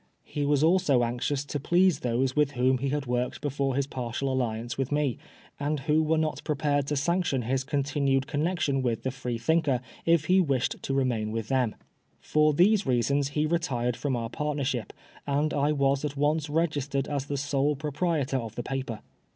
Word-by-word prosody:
He 145 -1 -3
waa 145 0 +3
also 165 -6 +4
anxionB 125 +4 -1
to 145 +1 -3
please 175 +2 +3
those 125 +2 0
with 150 -1 +2
whom 130 0 +2
he 140 +2 -1
had 145 0 -1
worked 125 0 -1
before 140 -2 -1
his 140 0 +1
partial 130 0 -3
alliance 120 -2 -2
with 135 +1 -2
me, 145 -5 0 0.4
and 145 0 -1
who 150 +3 +2
were 160 +1 +1
not 155 -1 -1
prepared 145 -1 0
to 150 - -1
sanction 145 -3 0
his 130 +3 0
continued 140 -1 0
connexion 150 -1 0
with 120 -3 -1
the 130 - -1
JFreethmker 130 +3 0 0.2
if 165 -2 +3
he 185 +3 +4
wished 135 -7 0
to 135 - -2
remain 120 -5 0
with 115 -1 -4
them. 130 -5 +1 0.4
For 155 0 +3
these 195 +7 +3
reasons 135 +3 +2
he 150 - +3
retired 130 -8 0
from 135 0 -1
our 115 -1 -3
partnership, 140 -6 -2 0.4
and 145 +2 +1
I 145 +1 +2
was 140 -1 +1
at 145 -1 -3
once 150 +1 +1
registered 145 -3 0
as 140 -1 -3
the 145 - -2
sole 145 +1 +1
proprietor 150 -1 -1
of 115 -3 -5
the 120 - -4
paper. 130 -4 -4
140 Hz, 185 wpm, -27 LUFS, 130-150 Hz, 0.4 s, also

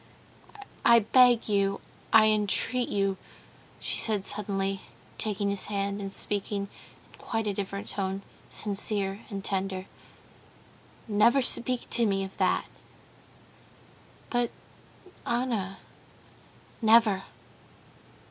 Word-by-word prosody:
"I 235 - +7
beg 245 +1 +5
you, 200 -1 +1 0.3
I 220 -1 +7
entreat 215 +3 +3
you," 195 -1 0 0.6
she - - -1
said 210 -3 +1
suddenly, 195 -2 -2 0.4
taking 205 -1 -1
his 200 - -1
hand, 200 0 -2
and 195 -1 -5
speaking 200 0 -2 0.4
in - - -18
quite 225 -2 -3
a 205 - -1
different 195 0 -5
tone, 195 0 -3 0.3
sincere 200 -1 0
and 195 -3 -5
tender, 190 -1 -2 1.2
"never 225 +5 +4
speak 250 0 0
to 235 -2 +3
me 195 -1 0
of 190 0 -8
that!" - - +1 1.7
"But, 240 -1 +1 0.8
Anna...." 235 -6 -1 1.0
"Never. 220 -3 +4
205 Hz, 100 wpm, -28 LUFS, 195-225 Hz, 1.7 s, I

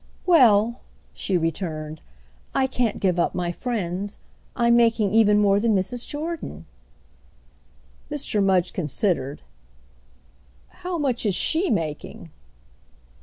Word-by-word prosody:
"Well," 235 - +5 0.3
she 190 - -1
returned, 160 -2 -3 0.5
"I 265 - +3
can't 250 -4 -1
give 180 -3 +1
up - - +1
my 175 -1 -1
friends. 200 -2 -4 0.4
I'm 235 0 +3
making 230 -4 +3
even 210 -2 +5
more 200 -1 +4
than 220 0 +2
Mrs. 230 +6 -1
Jordan." 310 - -5 1.4
Mr. 205 -2 -1
Mudge 185 -2 +2
considered. 150 -3 -1 1.3
"How 360 -1 -5
much 270 -6 -1
is 205 -5 +1
she 330 - +1
making?" 160 -7 -3
205 Hz, 110 wpm, -24 LUFS, 180-240 Hz, 1.4 s, Well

